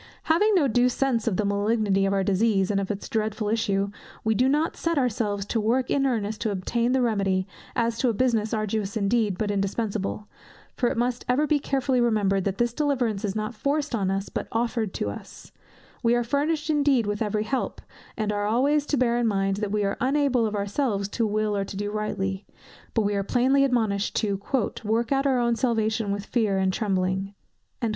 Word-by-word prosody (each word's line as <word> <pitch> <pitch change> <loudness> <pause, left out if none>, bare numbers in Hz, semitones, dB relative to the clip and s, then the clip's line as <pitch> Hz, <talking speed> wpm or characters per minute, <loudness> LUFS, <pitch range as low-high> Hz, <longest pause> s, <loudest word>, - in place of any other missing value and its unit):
Having 410 +7 +3
no 310 -7 +4
due 245 +1 +3
sense 250 -3 0
of 195 -6 +1
the 210 - +1
malignity 200 -1 +1
of 195 - 0
our 195 -1 +1
disease, 195 0 +2
and 200 - +1
of 195 - -3
its 205 -2 -4
dreadful 215 -1 -1
issue, 200 -3 0 0.3
we 220 - +2
do 255 +5 +2
not 300 +4 +1
set 335 -1 -1
ourselves 210 -6 0
to 225 +2 -1
work 245 +4 +1
in 275 -1 +2
earnest 220 -4 -2
to 225 - 0
obtain 230 +5 0
the 260 -1 +2
remedy, 195 -4 +1 0.3
as 230 -1 0
to 255 - +2
a - - +1
business 225 -2 +1
arduous 215 -1 -2
indeed, 210 -1 +1
but 210 0 -1
indispensable: 205 +1 -2 0.5
for 245 - +1
it - - -3
must 245 +1 0
ever 270 +5 +3
be 300 -1 +2
carefully 270 -2 0
remembered, 205 -5 +1
that 195 -1 -1
this 240 -1 +1
deliverance 245 -8 0
is 200 -1 -2
not 215 +2 -2
forced 285 +5 -1
on 200 -5 0
us, 195 +1 -1
but - - -4
offered 230 -2 -1
to - - -2
us; - - -11 0.5
we 235 0 +3
are 240 - +1
furnished 300 +5 0
indeed 285 -6 +3
with 205 +1 -2
every 210 -1 0
help, 260 +4 -2 0.4
and 215 -2 -1
are 205 0 -1
always 280 +6 +2
to 290 - +1
bear 240 -1 +2
in 240 - +2
mind, 195 -2 0
that 205 -1 -2
we 210 0 +1
are 200 0 -1
unable 260 -3 +2
of 210 - -4
ourselves 200 0 -1
to 225 +2 -1
will 215 0 0
or 200 - 0
to 195 0 -7
do 205 0 -2
rightly; 195 -2 -2 0.5
but 225 - +3
we 205 0 0
are 200 - 0
plainly 260 +6 +3
admonished 220 -6 0
to 200 -2 0 0.4
"work 225 +3 0
out 275 0 +2
our 265 -2 +2
own 235 -1 +2
salvation 220 -3 0
with 200 0 -3
fear 215 -5 +1
and 190 0 +1
trembling." 195 -1 -1
220 Hz, 205 wpm, -25 LUFS, 200-250 Hz, 0.5 s, no